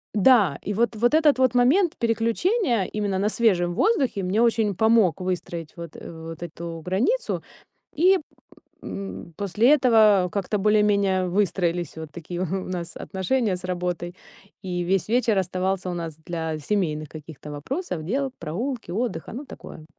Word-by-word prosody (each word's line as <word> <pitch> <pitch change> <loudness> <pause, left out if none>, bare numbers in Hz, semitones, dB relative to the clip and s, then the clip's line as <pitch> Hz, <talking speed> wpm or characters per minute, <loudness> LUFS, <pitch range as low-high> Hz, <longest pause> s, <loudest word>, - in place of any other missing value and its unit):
Да, 205 - +5
и 205 - -3
вот, 235 +2 +1
вот 240 +5 +2
этот 300 -4 +4
вот 255 -2 +3
момент 300 +9 +4
переключения 235 - +1
именно 205 -1 -2
на 200 +2 +1
свежем 185 -7 +2
воздухе 270 - +1
мне 190 +4 +1
очень 220 -4 +2
помог 220 -4 +3
выстроить 175 -3 -4
вот 170 -2 -9
эт - - -10
вот 165 0 -8
эту 170 0 -7
границу, 240 - 0 0.5
и, 370 +5 +5 0.6
м, 195 -3 -7
после 210 +5 +2
этого 215 -9 +4
как-то 200 +1 -1
более-менее 200 -2 +2
выстроились 175 -3 0
вот 160 -1 -7
такие 175 +1 -7
у - - +1
нас 180 -1 -4
отношения 200 +2 -1
с 180 - -11
работой, 180 -1 -3 0.5
и 180 -2 -3
весь 185 +2 0
вечер 235 -2 +2
оставался 185 0 -1
у - - -3
нас 165 -3 -5
для 160 -2 -3
семейных 155 -3 -1
каких-то 155 -1 -10
вопросов, 180 - -4
дел, 265 - -1
прогулки, 225 - -4
отдыха, 230 +6 -3
ну, 270 +5 -6
такое. 155 - -11
195 Hz, 150 wpm, -24 LUFS, 175-230 Hz, 0.6 s, Да